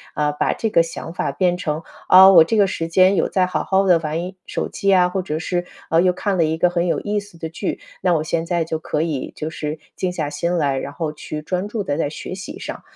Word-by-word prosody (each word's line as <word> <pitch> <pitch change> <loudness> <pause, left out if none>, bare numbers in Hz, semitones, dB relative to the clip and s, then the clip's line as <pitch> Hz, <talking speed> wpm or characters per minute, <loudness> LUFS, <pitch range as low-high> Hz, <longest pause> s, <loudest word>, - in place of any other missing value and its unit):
啊， 150 0 +1
把 150 - 0
这 225 - -2
个 170 - +4
想 165 0 -6
法 - - -2
变 180 -2 +1
成： 155 -2 -3 0.2
“啊， 190 +1 +9
我 165 -4 +9
这 220 - 0
个 200 -2 +4
时 165 -2 -3
间 185 +3 +4
有 - - +2
在 185 -1 +2
好 180 -4 -2
好 195 0 +2
地 175 -3 +5
玩 155 0 -3 0.3
手 - - -3
机 200 - -5
呀， 180 -2 +5
或 190 +1 -2
者 155 -4 -3
是， 175 +1 -2 0.2
呃， 165 +1 +4
又 180 0 +3
看 195 +1 -1
了 165 - +3
一 160 +1 -1
个 180 +2 +3
很 175 0 0
有 - - 0
意 210 0 -1
思 200 -4 -13
的 160 -1 -5
剧， 165 - -4 0.2
那 180 - +2
我 155 - +1
现 165 +1 -1
在 170 -1 0
就 160 0 -3
可 155 -2 -2
以 155 -6 -3
就 155 - -4
是 155 -1 -4 0.2
静 185 - -1
下 155 -4 -2
心 170 +4 -1
来， 140 -5 +1
然 140 - -6
后 155 0 -3
去 150 0 -7
专 180 +5 -2
注 210 -1 -3
地 145 -6 -2
在 160 - 0
学 160 - -7
习 190 +1 -7
上”。 - - -6
170 Hz, 285 characters per minute, -21 LUFS, 155-185 Hz, 0.3 s, 啊